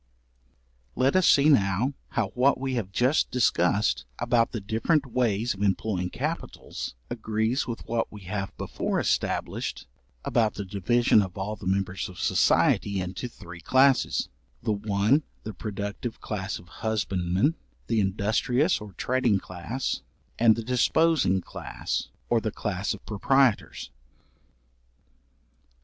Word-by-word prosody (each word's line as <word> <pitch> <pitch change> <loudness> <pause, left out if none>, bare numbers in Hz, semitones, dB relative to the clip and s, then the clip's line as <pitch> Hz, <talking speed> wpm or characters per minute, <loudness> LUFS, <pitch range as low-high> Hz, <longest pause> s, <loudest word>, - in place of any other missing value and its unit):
Let 135 +4 +2
us 185 -2 +4
see 140 +1 +6
now, 110 -1 +3 0.2
how 110 -5 -1
what 130 +1 +2
we 135 0 -2
have 110 -6 -2
just 125 +8 +2
discussed 100 -4 +2
about 115 -1 +2
the 115 - -3
different 115 - +1
ways 120 -2 0
of 100 - -10
employing 95 -2 0
capitals, - - -5 0.2
agrees 110 +2 -1
with 120 -2 -5
what 115 0 -1
we 105 - -10
have 100 +1 -5
before - - -2
established - - -1 0.4
about 110 -3 +1
the 100 - -4
division 105 +4 +3
of 95 -2 -5
all 100 +2 -3
the 100 - -8
members 95 -1 -1
of 90 - -12
society 100 -1 +3
into 90 +7 -4
three 90 -6 -11
classes, 130 +7 +3 0.4
the 110 - +1
one 105 +6 +2 0.2
the 110 - -6
productive 100 +4 -5
class 95 -3 -4
of 85 - -15
husbandmen, 100 - +1 0.3
the 115 -2 +1
industrious 110 - +1
or 105 -2 -9
trading 125 -3 +1
class, 95 +8 -4 0.4
and 115 -1 +6
the 115 - -4
disposing 125 - +2
class, - - -4 0.2
or - - +2
the - - -1
class - - -2
of - - -16
proprietors. 125 +3 +1
110 Hz, 130 wpm, -27 LUFS, 100-125 Hz, 0.4 s, see